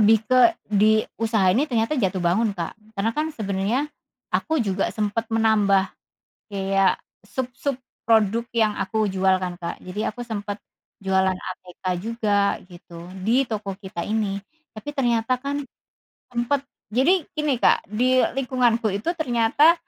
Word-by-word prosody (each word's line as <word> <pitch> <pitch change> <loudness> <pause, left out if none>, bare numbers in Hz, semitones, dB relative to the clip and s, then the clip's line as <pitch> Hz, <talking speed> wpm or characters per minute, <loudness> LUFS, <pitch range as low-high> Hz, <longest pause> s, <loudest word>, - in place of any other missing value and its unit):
lebih 215 +1 +6
ke 255 +8 +5
di 215 +1 +3 0.2
usaha 220 -5 +3
ini 285 +9 +1
ternyata 230 +3 +1
jatuh 190 -4 +1
bangun 195 +6 +2
Kak, 170 -1 -3 0.2
karena 200 +3 +1
kan 305 +4 -1
sebenarnya 205 +6 -1 0.5
aku 320 0 +1
juga 195 -1 0
sempet 215 +1 -1
menambah 210 -4 +3 0.6
kayak 195 -1 +2 0.3
sub-sub 255 +4 -3 0.3
produk 225 0 +3
yang 220 -2 +3
aku 215 +2 0
jual 190 0 +3
kan 180 -1 -3
Kak, 170 -1 -5
jadi 200 +4 -3
aku 245 - -10
sempet 205 -2 -4 0.4
jualan 190 -1 +2
ATK 180 0 -10 0.2
juga, 210 -2 +1
gitu, 175 -1 -12 0.2
di 245 +6 +3
toko 210 -3 -3
kita 190 -3 -7
ini. 205 -2 -1 0.4
Tapi 215 - -8
ternyata 240 -2 +2
kan 280 +1 -2 0.7
sempet 245 +3 0 0.3
jadi 310 - +3
gini 300 -4 0
Kak - - +3
di 255 +4 +3 0.2
lingkunganku 250 -3 +2
itu 200 +9 -3
ternyata 275 +2 +4
220 Hz, 140 wpm, -24 LUFS, 195-245 Hz, 0.7 s, lebih